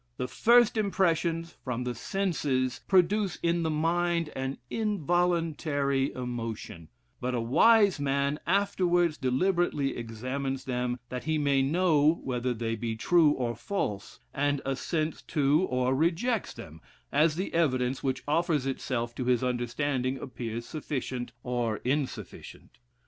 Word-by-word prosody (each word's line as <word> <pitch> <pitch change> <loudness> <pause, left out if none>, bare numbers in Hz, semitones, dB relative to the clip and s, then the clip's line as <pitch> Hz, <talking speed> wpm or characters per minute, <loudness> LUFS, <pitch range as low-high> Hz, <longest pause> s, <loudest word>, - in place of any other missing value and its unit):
The 125 - -2
first 235 - +4
impressions 170 -5 0
from 125 -1 -3
the 125 0 -2
senses 130 - -1
produce 190 +1 +3
in 170 0 +2
the 160 - 0
mind 170 +1 0
an 135 +1 -3
involuntary 165 -8 0
emotion; 115 -9 -5 0.3
but 125 0 -2
a - - 0
wise 200 - +4
man 140 +1 0
afterwards 175 -3 +2
deliberately 145 +1 +1
examines 130 +4 -4
them, 125 -1 -1
that 125 0 -5
he 160 0 +1
may 140 -2 +2
know 155 +1 +3
whether 125 -1 -1
they 115 -1 -2
be 115 0 -3
true 160 +7 +4
or 120 -3 -2
false, 105 - -4
and 145 0 +1
assents 155 +4 -2
to, 150 +5 +2
or 125 0 +1
rejects 175 - 0
them, 80 0 -11 0.3
as 155 0 +3
the 185 +4 -3
evidence 130 -5 +1
which 130 -1 -2
offers 155 -2 +1
itself 125 -3 -2
to 125 - -4
his 125 -1 +2
understanding 125 +2 -1
appears 120 -3 -5
sufficient 130 -5 -4
or 120 -3 -1
insufficient. 140 +1 -4
140 Hz, 130 wpm, -28 LUFS, 125-170 Hz, 0.3 s, first